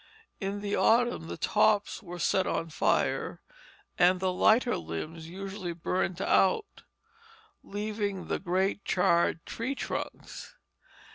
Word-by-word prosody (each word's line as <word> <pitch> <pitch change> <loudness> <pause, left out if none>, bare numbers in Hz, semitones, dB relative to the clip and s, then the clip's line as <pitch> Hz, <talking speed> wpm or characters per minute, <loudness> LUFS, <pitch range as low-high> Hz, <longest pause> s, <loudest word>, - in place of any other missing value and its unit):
In 200 0 -3
the 205 0 -1
autumn 235 - +3
the 85 0 -6
tops 210 0 +2
were 175 -3 -8
set 185 +2 +1
on 165 -1 -2
fire, - - 0 0.6
and 180 +1 +5
the 185 0 +1
lighter 225 +6 +4
limbs 155 - -6
usually 190 -1 -5
burned 175 +1 -2
out, 195 - +2 0.8
leaving 205 -2 -3
the - - -2
great 190 +2 0
charred 170 -2 +2
tree 255 +5 -3
trunks. - - -6
190 Hz, 120 wpm, -29 LUFS, 175-205 Hz, 0.8 s, and